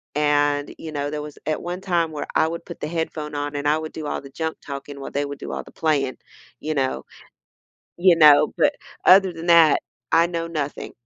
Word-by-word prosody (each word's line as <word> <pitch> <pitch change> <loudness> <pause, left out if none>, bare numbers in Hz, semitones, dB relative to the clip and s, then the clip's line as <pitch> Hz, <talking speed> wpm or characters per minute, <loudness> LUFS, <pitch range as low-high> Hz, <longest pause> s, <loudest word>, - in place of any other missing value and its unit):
and, 145 -1 +1
you 160 - -8
know, 145 -1 -2
there 150 0 -4
was 150 -1 -9
at 155 - -1
one 175 +1 -4
time 170 -4 0
where 150 - -5
I - - +4
would 170 +1 -6
put 170 - -9
the - - -2
headphone 155 -2 -4
on 145 0 -3
and 145 0 -2
I 150 +1 +3
would 155 0 -6
do 155 -2 -6
all - - -2
the 140 - -12
junk-talking 140 -2 -6
while - - -7
they 145 +1 -1
would 145 0 -7
do - - -6
all - - -4
the - - -15
playing, 140 -5 0 0.4
you 155 - -3
know? 135 -2 -1 0.9
You 175 -1 +5
know? 150 -3 +7
But - - +3 0.3
other 190 0 +7
than 165 0 -8
that, 165 -2 +6 0.3
I 165 +1 +5
know 170 -1 -3
nothing. 150 -3 -4
155 Hz, 215 wpm, -23 LUFS, 145-165 Hz, 0.9 s, know